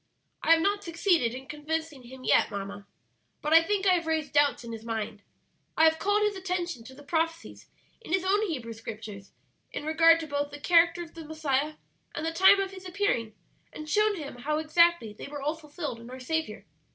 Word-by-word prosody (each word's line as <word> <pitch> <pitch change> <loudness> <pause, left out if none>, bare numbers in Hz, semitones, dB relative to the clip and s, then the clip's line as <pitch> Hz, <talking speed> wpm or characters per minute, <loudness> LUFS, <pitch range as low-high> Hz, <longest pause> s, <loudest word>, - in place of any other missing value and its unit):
"I 330 - +5
have 325 - +3
not 405 +2 +1
succeeded 335 - +1
in 260 +1 -8
convincing 300 0 -4
him 255 +1 -12
yet, - - +3
mamma, 200 0 -6 0.5
but 300 +1 -1
I 330 - +9
think 400 +3 -1
I 375 - +6
have 340 -2 0
raised 315 -3 -1
doubts 290 -3 +3
in 235 - -8
his 225 -1 -7
mind. 220 -2 -4 0.6
I 320 - +5
have 320 0 +5
called 410 +1 +2
his 420 -1 +1
attention 360 -8 -3
to 260 +2 -12
the 290 - -14
prophecies 330 +2 -3 0.3
in - - -10
his 375 -1 +2
own 395 +2 +2
Hebrew 250 -9 -4
Scriptures 215 -3 -9 0.4
in - - -5
regard 330 +1 +5
to - - -5
both 285 -1 -2
the 290 0 -10
character 340 +2 +4
of 330 - -14
the 330 - -9
Messiah 305 -1 -1 0.4
and 305 - -3
the 325 - -1
time 380 +3 +6
of 390 -1 -2
His 375 -1 -10
appearing, 345 - -1 0.4
and 305 - -9
shown 425 +5 +2
him 290 -7 -7
how 300 +5 -1
exactly 315 -6 +3
they - - -9
were 290 0 -7
all 300 +2 0
fulfilled 300 -5 -7
in 235 +1 -11
our 255 +1 -8
Saviour. 320 +5 -3
315 Hz, 210 wpm, -28 LUFS, 260-345 Hz, 0.6 s, I